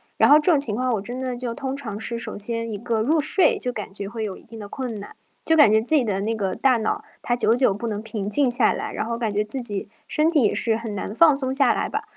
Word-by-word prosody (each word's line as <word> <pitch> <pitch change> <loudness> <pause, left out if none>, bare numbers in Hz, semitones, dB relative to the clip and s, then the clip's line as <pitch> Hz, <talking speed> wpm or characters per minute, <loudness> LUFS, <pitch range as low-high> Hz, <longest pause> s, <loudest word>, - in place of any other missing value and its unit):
然 - - +4
后 295 +1 +8
这 310 - +1
种 305 - +3
情 230 -7 +1
况 255 0 0
我 210 - -1
真 245 +5 -6
的 255 -1 -3
就 240 -1 -4
通 270 +1 -4
常 220 -7 -5
是， 235 +1 -2
首 230 - -4
先 230 +2 -2
一 210 - -4
个 230 0 -2
入 305 +8 +1
睡 385 - +3
就 250 - -2
感 210 -2 -6
觉 200 0 -5
会 225 +2 -5
有 200 -3 -5
一 - - -18
定 225 0 -12
的 205 - -8
困 245 -4 -5
难， 200 - -11 0.3
就 320 - +4
感 295 -9 +6
觉 220 0 +4
自 280 +8 +1
己 285 - +4
的 200 -4 -1
那 225 +3 -1
个 195 -3 -2
大 260 -3 +2
脑 220 - -2 0.2
它 240 - 0
久 235 -1 +2
久 250 -5 +2
不 210 +4 -5
能 210 -2 -3
平 215 -2 -5
静 265 +5 +3
下 240 -2 +3
来， - - -5
然 - - -3
后 230 +1 -3
感 225 -3 -2
觉 210 +1 0
自 215 +6 -4
己 205 -5 -4 0.2
身 305 +1 +1
体 305 -6 +2
也 210 - +2
是 225 -2 +1
很 225 -2 -6
难 200 - -5
放 305 +4 +5
松 260 -2 0
下 270 -1 +4
来 - - -2
吧。 430 - -3
235 Hz, 320 characters per minute, -22 LUFS, 215-265 Hz, 0.3 s, 后